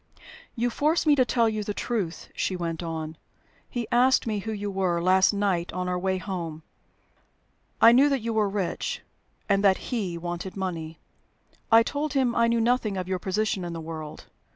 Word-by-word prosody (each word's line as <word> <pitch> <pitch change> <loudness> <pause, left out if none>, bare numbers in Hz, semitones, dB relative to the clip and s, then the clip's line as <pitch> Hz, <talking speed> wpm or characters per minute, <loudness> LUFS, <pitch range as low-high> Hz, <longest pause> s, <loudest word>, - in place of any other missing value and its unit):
"You 240 0 0
force 310 +7 +1
me 300 - +6
to 260 - +4
tell 235 -2 +2
you 215 -1 -1
the 205 0 -4
truth," 200 -8 -3
she 190 - -1
went 170 -2 -3
on. 160 -2 -5 0.5
"He 240 -3 -3
asked 255 +2 +4
me 215 -3 -1
who 220 +3 -5
you 205 -1 -3
were, 185 -3 0
last 185 +2 +4
night 195 -4 0
on 180 0 -2
our 180 0 -1
way 190 +1 0
home. 170 -5 -5 1.2
I 230 - +8
knew 270 +4 +5
that 275 -3 0
you 230 +1 -2
were 215 -2 +2
rich, 205 - -3 0.4
and 200 -1 +2
that 195 +4 +2
he 190 -8 -2
wanted 175 +3 -5
money. 165 -4 -4 0.7
I 225 0 +8
told 290 +3 -3
him 260 -4 +1
I 230 0 +4
knew 230 0 +2
nothing 230 -3 +1
of 180 -1 -3
your 185 -1 -1
position 195 0 -1
in 175 -1 -4
the 165 - -5
world. 155 -2 -7
200 Hz, 190 wpm, -26 LUFS, 175-230 Hz, 1.2 s, I